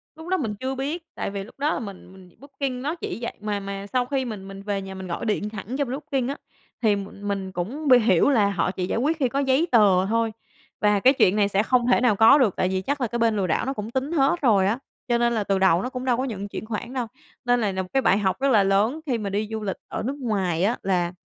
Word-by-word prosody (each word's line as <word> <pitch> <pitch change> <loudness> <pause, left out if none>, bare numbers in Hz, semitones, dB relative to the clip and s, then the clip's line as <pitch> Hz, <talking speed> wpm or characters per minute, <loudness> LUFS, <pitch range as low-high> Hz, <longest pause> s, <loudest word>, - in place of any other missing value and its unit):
Lúc 320 +1 -11
đó 375 +1 +1
mình 220 - -3
chưa 260 +1 -3
biết, 295 +6 -3
tại - - -3
vì 200 -1 -4
lúc 240 +6 -16
đó 300 +2 +1
là - - -2
mình 195 -4 -9
mình 185 -1 -15
Booking 275 -2 -4
nó 300 +5 -2
chỉ - - -5
vậy, 235 - -3
mà 210 -1 -2
mà 195 0 -6
sau 250 -1 +2
khi 265 0 -1
mình 205 -5 -6
mình 195 0 -9
về 200 -1 -2
nhà 190 0 -8
mình 190 0 -7
gọi 170 - -4
điện 210 -1 -1
thẳng 215 +5 -6
cho 285 - +1
bên 245 - -6
Booking 275 -3 -2
á, 280 - -3 0.4
thì 215 -3 +3
m 200 +1 -7
mình 195 -2 -3
cũng 230 - -4
bi 255 -2 +7
hiểu 215 -2 +3
là 215 -7 +3
họ 180 -2 0
chỉ 185 -1 -3
giải 220 - -1
quyết 305 +6 +1
khi 260 -4 +2
có 275 - -1
giấy 275 +4 +2
tờ 200 -6 +5
thôi 225 +2 0 0.5
và 210 -1 +3
cái 260 +7 +5
chuyện 195 -7 +3
này 205 -1 +3
sẽ 200 +1 +1
không 245 +1 +2
thể 245 - +4
nào 245 -4 +3
có 225 +7 +7
được 245 -9 +2
tại - - +1
vì 190 0 -1
chắc 285 +7 -2
là 245 - +1
cái 235 +2 -3
bên 230 -1 +2
lừa 190 -2 0
đảo 160 - 0
nó 270 - -1
cũng 215 -3 -6
tính 265 +5 -2
hết 295 +2 +2
rồi 205 -8 +4
á, 225 +5 0 0.3
cho 240 -1 +2
nên 235 0 +2
là 220 -3 0
từ 195 -1 0
đầu 185 -2 +4
nó 250 - -3
cũng 255 0 -6
đâu 245 -2 +2
có 260 - -1
nhận 205 -6 -4
chuyển 205 - -6
khoản 230 +3 -5
đâu. 250 -3 -2 0.4
Nên 245 0 +3
này 205 -3 0
là 190 - -1
một 185 - -7
cái 270 - +3
bài 190 - +3
học 190 -3 0
rất 275 +1 +2
là 205 -4 +5
lớn 205 +9 +2
khi 255 -5 0
mà 210 -3 -3
đi 205 +2 -1
du 220 - -3
lịch 195 - -3
ở - - -4
nước 265 +5 -2
ngoài 190 -7 0
á 230 +5 +1
là 180 -2 0
220 Hz, 295 wpm, -24 LUFS, 195-260 Hz, 0.5 s, bi